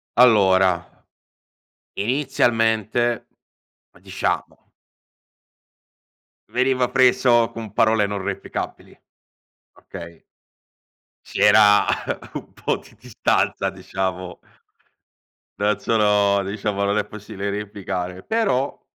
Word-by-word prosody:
Allora, 95 -7 +3 0.9
inizialmente 120 -2 +1 0.7
diciamo - - -4 1.8
veniva 130 0 +1
preso 125 -2 +4
con 110 -3 -8
parole 110 -2 +3
non 100 -1 -4
replicabili, 100 0 -5 0.8
okay? 85 -1 -11 1.0
C'era 105 -1 +5 0.5
un - - -8
po' - - -2
di - - -18
distanza, - - 0
diciamo 95 -1 -5 1.2
non 105 0 +1
sono 105 -2 +2
diciamo, 100 0 -3
non 100 +1 +1
è 105 - 0
possibile 100 -1 -7
replicare, 95 -3 -5
però 200 - -1
105 Hz, 75 wpm, -22 LUFS, 100-120 Hz, 1.8 s, C'era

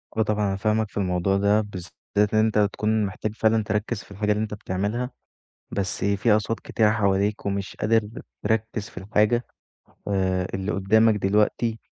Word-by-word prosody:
آه، 110 - +2
طبعًا 105 -1 +1
أنا 95 - -1
فاهمك 110 +2 0
في - - -11
الموضوع 95 0 +1
ده 100 +2 +3
بالذات 100 +1 -3
إن 110 - +4
أنت 110 -1 +2 0.2
تكون 110 0 +1
محتاج 100 +3 -4
فعلًا 110 -1 +2
تركّز 105 +1 -2
في - - -20
الحاجة 105 +1 -1
اللي 105 +1 +1
أنت 110 -1 -4
بتعملها، 105 +5 -2 0.6
بس 95 -2 -2
في 100 +3 +2
أصوات 110 +1 -2
كتيرة 110 -2 +2
حواليك 100 -1 +1
ومش 100 -1 -3
قادر 110 -1 +1 0.3
تركّز 110 0 -1
في - - -9
الحاجة 105 +5 +1 0.6
آآ، 95 -2 0
اللي 95 +2 -2
قدّامك 110 +3 +4
دلوقتي 105 +3 +1
105 Hz, 165 wpm, -24 LUFS, 100-110 Hz, 0.6 s, إن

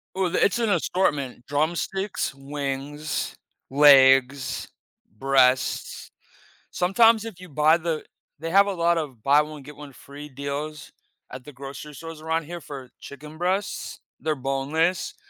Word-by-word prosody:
Well, 185 -2 0
it's 200 - +3
an 225 -2 +1
assortment, 145 -8 0
drumsticks, 170 +6 -1
wings, 140 +2 -4 0.3
legs, 135 -1 +5 0.5
breasts. 130 -1 +1 0.6
Sometimes 225 +4 +4
if 185 -6 -8
you 185 -2 -11
buy 155 +3 +4
the 160 -2 -3 0.4
they 165 +1 -4
have 200 +1 +6
a 200 - -1
lot 170 -1 +2
of 130 -8 -7
buy-one-get-one-free 145 -1 -2
deals 140 +2 -6 0.4
at 130 0 -8
the 150 - -11
grocery 140 +2 -9
stores 165 0 -9
around 160 0 -1
here 170 +2 -8
for 135 -4 -9
chicken 150 +2 -11
breasts. 190 +3 -2 0.2
They're 155 -1 -1
boneless. 140 +6 -1
150 Hz, 120 wpm, -24 LUFS, 135-170 Hz, 0.6 s, have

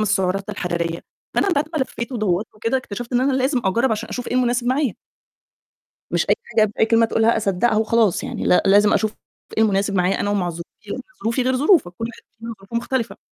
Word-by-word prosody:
السعرات 195 -1 0
الحرارية 170 -4 -3 0.3
فأنا - - +2
بعد 300 -3 +1
ما - - +1
لفيت 235 0 -5
ودوّرت 210 -3 0
وكده، 230 +4 -1
اكتشفت 245 0 -6
إن 245 - +3
أنا 270 +1 +2
لازم 260 0 +1
أجرّب 235 +7 +2
عشان 215 - -3
أشوف 245 - -5
إيه - - -3
المناسب 245 -1 +1
معايا. 260 -3 +1 1.2
مش - - 0
أي - - +6
حاجة 220 - +2
بأي 215 +1 0
كلمة 230 0 +4
تقولها 225 +1 +2
أصدّقها 210 +1 +1
وخلاص 220 -2 +2
يعني - - -4
لا 180 - +4
لازم 205 +1 +5
أشوف 215 -1 0 0.4
إيه 220 - +4
المناسب 200 -1 +1
معايا 185 +1 +1
أنا 205 - 0
ومع 190 -4 0
ظروفي، 170 +1 -11
لإن - - -3 0.2
ظروفي 230 +3 0
غير 255 +1 +1
ظروفك، 295 - +3
كُلّ 225 - -6
واحد 235 - -12 0.2
فينا 230 0 -7
ظروفه 195 +4 -7
مختلفة. 235 0 -2
220 Hz, 205 wpm, -21 LUFS, 195-245 Hz, 1.2 s, أي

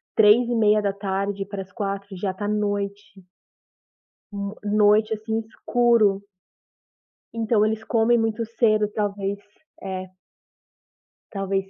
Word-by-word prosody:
15h30 210 -3 +2
para 200 -1 -5
as 190 +1 -11
4 200 -1 -4
já 195 0 -1
está 205 +2 -5
noite. 205 -1 -1 1.3
N 200 +1 -4 0.2
noite, 210 +1 +4
assim, 220 +1 -2
escuro. 225 -3 +1 1.1
Então 225 -2 +2
eles 220 0 -2
comem 230 +1 +2
muito 225 0 -1
cedo, 215 -2 +2
talvez. 200 -1 -2 0.4
É. 185 -1 -6 1.2
Talvez 195 -1 -2
210 Hz, 100 wpm, -23 LUFS, 200-220 Hz, 1.3 s, noite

